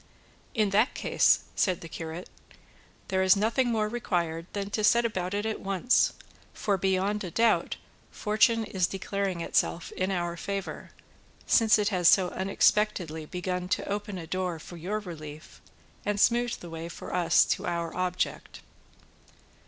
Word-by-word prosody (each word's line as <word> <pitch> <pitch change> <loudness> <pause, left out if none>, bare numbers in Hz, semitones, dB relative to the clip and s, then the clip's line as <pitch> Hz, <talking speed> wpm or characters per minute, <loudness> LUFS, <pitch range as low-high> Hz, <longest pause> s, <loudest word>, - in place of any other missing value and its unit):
"In 215 -3 +2
that 215 +6 +3
case," - - +3
said 185 -3 +1
the 165 - -8
curate, 165 +2 -7 0.8
"there 190 0 +1
is 190 +1 +6
nothing 225 +5 +1
more 215 -2 +1
required 175 -7 -2
than 200 0 -4
to 215 - -1
set 235 +3 +5
about 185 -4 -2
it 205 +1 -1
at 220 -1 -2
once, 195 +6 +2 0.4
for 205 - 0
beyond 195 +2 0
a 180 - -4
doubt 230 +5 +2 0.3
fortune 225 +2 +2
is 190 -4 0
declaring 195 -2 -3
itself 170 0 0
in 185 +1 -2
our 175 -2 -1
favour, 195 +2 -5 0.6
since 225 -2 +5
it 205 -1 +1
has 180 -4 +2
so 185 -2 +6
unexpectedly 190 -4 +1
begun 180 +1 -3
to - - -1
open 205 -1 -3
a 170 - -6
door 180 0 -2
for 170 +2 -11
your 180 +6 -3
relief, 155 -6 -9 0.4
and 205 0 -1
smoothed 240 +2 +2
the 170 - -9
way 165 +1 -6
for - - -8
us 170 -2 +4
to - - -1
our 170 -1 -2
object." 180 0 -2
190 Hz, 155 wpm, -28 LUFS, 175-210 Hz, 0.8 s, is